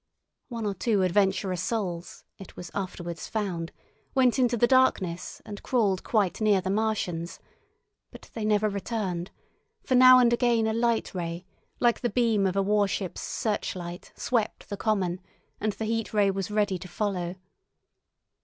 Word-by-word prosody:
One 230 -4 -5
or 205 - 0
two 200 0 +1
adventurous 190 -1 +1
souls, 185 -5 -3 0.2
it 195 - -11
was 175 - -8
afterwards 175 -3 -5
found, 185 -6 -3 0.4
went 260 -1 +3
into 245 -1 +2
the 240 - +5
darkness 205 -9 +1
and 205 -1 -8
crawled 205 -7 +1
quite 210 -3 0
near 210 -3 +4
the 185 +1 -2
Martians; 195 -6 -1 0.7
but - - -14
they 225 - -4
never 215 0 +2
returned, 200 -3 -3 0.5
for - - -1
now 255 0 +9
and 240 -1 +5
again 235 -2 +2
a 220 - 0
light 230 0 0
ray, 170 -1 -4 0.3
like 240 -1 +3
the 240 - 0
beam 225 -5 +2
of 185 - -2
a 195 - +2
warship's 200 -2 0
searchlight 180 -5 -4
swept 230 -4 -2
the 205 - -3
common, 195 -4 -1 0.4
and 215 -1 -1
the 220 +3 -4
Heat 225 0 -2
Ray 200 -2 +4
was 195 0 -3
ready 205 -3 0
to 185 - -9
follow. 180 -3 -2
205 Hz, 155 wpm, -27 LUFS, 185-225 Hz, 0.7 s, now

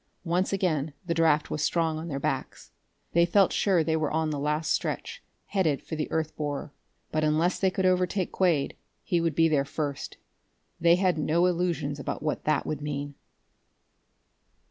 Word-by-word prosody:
Once 175 +3 +1
again 160 -7 0
the 170 - 0
draft 160 -2 +2
was 150 - -2
strong 160 -1 +1
on 165 - -6
their 140 -4 -3
backs. - - -3 0.4
They 170 - +5
felt 185 +2 +4
sure 185 -5 +3
they 160 0 0
were 155 -2 0
on 160 0 0
the 145 - -2
last 150 +2 0
stretch, - - -2 0.2
headed 165 -8 +1
for 160 - -5
the 155 - -3
earth 160 -1 -2
borer. 145 -1 -4 0.4
But, 155 0 0
unless 155 +4 +2
they 190 - +3
could 185 0 -1
overtake 185 0 +1
Quade, 170 -7 +1 0.3
he 175 -3 +1
would 165 -3 0
be 165 0 +5
there 150 -3 +2
first. 140 0 -4 0.6
They 170 0 +5
had 180 -3 +1
no 165 +4 +2
illusions 170 -5 0
about 140 - -4
what 150 - -2
that 155 -1 +1
would 150 -1 -3
mean.... 145 -1 -4
160 Hz, 175 wpm, -27 LUFS, 150-175 Hz, 0.6 s, They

